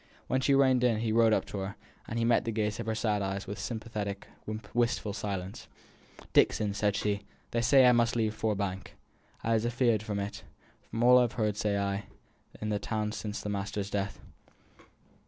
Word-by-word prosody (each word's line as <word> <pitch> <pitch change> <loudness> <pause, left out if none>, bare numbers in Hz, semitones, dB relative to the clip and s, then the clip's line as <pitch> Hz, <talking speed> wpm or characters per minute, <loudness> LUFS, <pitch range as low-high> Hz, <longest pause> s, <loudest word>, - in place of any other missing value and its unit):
When 130 - 0
she 140 +1 +3
reined 130 -2 +4
in 115 -3 +2
he 115 -1 0
rode 115 0 +5
up - - +2
to 100 - -5
her, 95 +1 -4 0.3
and 115 - -3
met 115 - +4
the 115 - -2
gaze 105 -1 -1
of 115 - -4
her 110 - 0
sad 110 -2 0
eyes 95 0 -2
with 100 +3 -6
sympathetic, 105 -3 -4 0.5
wistful 115 -3 +1
silence. 100 -3 -5 0.7
"Dixon," 105 -2 +3
said 105 0 +1
she, 100 -1 0 0.3
"they 115 - +1
say 130 +2 +6
I 125 - +8
must 120 0 +3
leave 110 -2 +1
Ford 110 -1 -1
Bank." 95 -1 -4 0.5
"I 115 - +1
was 110 -1 +2
afeared 120 -2 +2
on 105 - -1
it, 100 +1 -4 0.5
from 115 - -2
all 125 +1 +8
I've 120 -1 +2
heerd 105 -4 0
say 105 -1 0
i' 100 0 -1 0.5
the 105 -1 -1
town 105 +1 -2
since 105 -1 -4
the 105 - -4
master's 100 0 -3
death." 100 -1 -2
110 Hz, 190 wpm, -30 LUFS, 100-115 Hz, 0.7 s, I